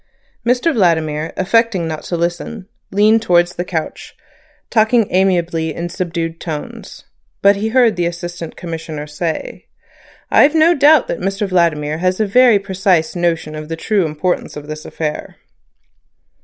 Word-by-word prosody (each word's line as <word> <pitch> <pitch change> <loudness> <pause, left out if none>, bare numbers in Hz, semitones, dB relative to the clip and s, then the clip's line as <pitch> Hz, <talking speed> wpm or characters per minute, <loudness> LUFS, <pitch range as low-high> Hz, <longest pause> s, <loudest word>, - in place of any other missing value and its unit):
Mr 250 +7 +1
Vladimir, 160 - +1
affecting 195 -2 +1
not 155 -1 -4
to 175 - -4
listen, 175 +4 -3 0.2
leaned 215 +3 +3
towards 175 -5 +2
the 175 - -3
couch, 165 -3 -5 0.6
talking 225 0 +3
amiably 175 -4 +1
in 170 +1 -4
subdued 170 -2 -4
tones, 155 -3 -7 0.4
but 200 +1 +6
he 205 +2 -2
heard 240 -2 +3
the 175 -1 0
Assistant 175 -1 -6
Commissioner 160 -3 -6
say: 155 +2 -5 0.6
"I've 295 +3 +5
no 320 +2 +5
doubt 295 -1 +5
that - - -3
Mr 195 +2 -2
Vladimir 160 -4 0
has 185 +2 0
a 215 - +2
very 240 +2 +5
precise 190 -4 0
notion 170 -3 -1
of 155 0 -7
the 165 - -3
true 195 +1 0
importance 155 +2 -2
of 145 - -8
this 155 +1 -8
affair." 155 -2 -5
175 Hz, 145 wpm, -17 LUFS, 165-210 Hz, 0.6 s, but